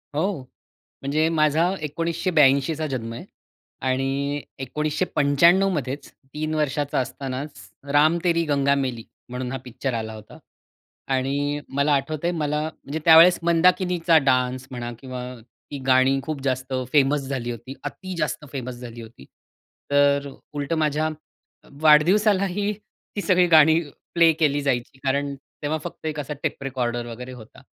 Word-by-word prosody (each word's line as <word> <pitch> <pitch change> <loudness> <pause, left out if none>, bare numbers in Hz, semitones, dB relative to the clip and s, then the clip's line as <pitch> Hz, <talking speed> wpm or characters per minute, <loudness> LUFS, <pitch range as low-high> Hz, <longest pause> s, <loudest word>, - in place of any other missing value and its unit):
हो. 175 -1 -1 0.6
म्हणजे 155 +4 +1
माझा 160 +1 +2
1982 155 -2 +2
चा 155 - -2
जन्म 120 -5 -4
आहे. - - -8 0.6
आणि 135 +2 -1 0.2
1995 150 +5 +2
मध्येच 140 -1 -4 0.2
3 155 +1 -2
वर्षाचा 145 -2 -1
असतानाच 135 +2 -6 0.2
राम 155 +4 +4
तेरी 170 -1 +2
गंगा 140 -1 +2
मैली 130 -5 -2 0.2
म्हणून 125 0 -4
हा 135 - -3
पिक्चर 125 +1 -4
आला 110 -1 -4
होता. 110 -1 -12 0.7
आणि 140 +2 -1
मला 140 +2 +2
आठवतंय 155 +4 -1
मला 150 -3 -1
म्हणजे 155 -1 -5
त्यावेळेस 165 +2 +8
मंदाकिनीचा 170 -1 +3
डान्स 130 -1 +1
म्हणा 120 -1 -5
किंवा 130 -1 -7 0.5
ती 145 - -5
गाणी 130 +1 +4
खूप 155 -3 -4
जास्त 130 0 -2 0.2
फेमस 145 0 +3
झाली 125 -3 -3
होती. 120 +3 -7
अति 185 +6 -6
जास्त 150 0 -2
फेमस 130 -2 -5
झाली 120 -1 -9
होती. 110 - -13 0.7
तर 140 0 +3 0.3
उलटं 145 +3 -2
माझ्या 155 0 +1 0.6
अ, - - -19
वाढदिवसालाही 195 +5 +4 0.4
ती 205 - -1
सगळी 180 -2 +4
गाणी 160 0 +6 0.3
प्ले 170 -1 +6
केली 145 -2 +2
जायची. 130 -1 -2
कारण 140 +1 0 0.3
तेव्हा 155 +2 -1
फक्त 170 - -7
एक 155 -1 -3
असा 150 +1 -5
टेप - - -3
रेकॉर्डर 120 -3 -2
वगैरे 125 +2 -8
होता. 115 -3 -13
145 Hz, 140 wpm, -23 LUFS, 130-160 Hz, 0.7 s, त्यावेळेस